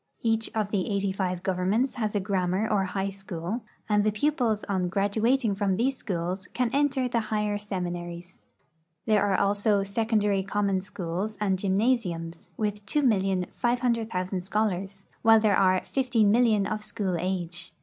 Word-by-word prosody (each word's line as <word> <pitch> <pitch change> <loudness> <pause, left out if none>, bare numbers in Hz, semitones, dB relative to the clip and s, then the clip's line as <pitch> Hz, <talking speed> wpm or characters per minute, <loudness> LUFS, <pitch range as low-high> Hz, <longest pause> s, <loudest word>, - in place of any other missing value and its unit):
Each 225 -1 +1
of 210 -2 -1
the 195 -4 0
eighty 200 -1 0
five 185 -2 -2
governments 190 +7 +1
has 215 -3 -2
a - - +3
grammar 190 +1 0
or 200 -3 +1
high 195 +1 -2
school, 195 +2 -5 0.3
and 210 -1 +3
the 215 - +2
pupils 230 -2 0
on 185 -3 -1
graduating 215 +5 +1
from 195 -1 0
these 260 +6 +1
schools 185 -3 -3
can 250 -2 +1
enter 275 -2 +2
the 235 -1 0
higher 210 -1 0
seminaries. 175 -3 -5 0.7
There 215 -2 +3
are 200 -2 +2
also 200 0 +2
secondary 205 -1 +1
common 195 0 0
schools 195 +2 -4
and 195 -3 +1
gymnasiums, 190 -5 0
with 210 -1 -2
2,o00,000 215 -3 0
scholars, 195 -1 -2 0.2
while 225 0 +6
there 215 -2 +3
are 185 -1 +4
15,000,000 230 -4 +2
of 215 0 -3
school 195 -4 -2
age. 175 -1 -3
205 Hz, 145 wpm, -27 LUFS, 185-220 Hz, 0.7 s, while